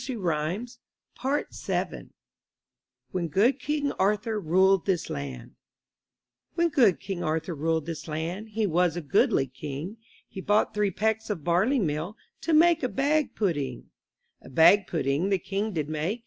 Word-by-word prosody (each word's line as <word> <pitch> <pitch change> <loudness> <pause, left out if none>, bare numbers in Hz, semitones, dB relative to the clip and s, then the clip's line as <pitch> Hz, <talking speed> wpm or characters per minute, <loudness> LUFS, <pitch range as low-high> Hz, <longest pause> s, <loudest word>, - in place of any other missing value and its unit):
43 260 0 -4
MY 165 -2 -1 0.6
BOOK 275 +3 0
HOUSE - - -2 1.2
WHEN 180 -2 -2
GOOD 225 - +2
KING 290 -1 -1
ARTHUR 210 +2 0
RULED 190 +3 +3
THIS 185 -4 0
LAND 65 -3 -6 1.1
HEN 340 0 +3
good 235 - +4
King 190 -2 -5
Arthur 160 +2 -1
ruled 160 0 -1
this 165 -1 -6
land, 165 +7 -4
He 215 0 -1
was 175 -2 +1
a - - -2
goodly 135 -2 +2
king; 145 - -7 0.3
He 190 - -8
bought 205 +3 +2
three 210 -1 +1
pecks 220 +4 -1
of 185 -8 -3
barley 185 - +2
meal, 170 - -2 0.2
To 330 - -2
make 330 +1 +5
a 255 - 0
bag 290 +3 0
pudding. 145 - -2 0.5
A - - -13
bag 170 +8 +5
pudding 155 +3 0
the 195 - +3
king 200 +4 -3
did 155 -6 -2
make. 155 +9 -2
190 Hz, 155 wpm, -27 LUFS, 160-220 Hz, 1.2 s, make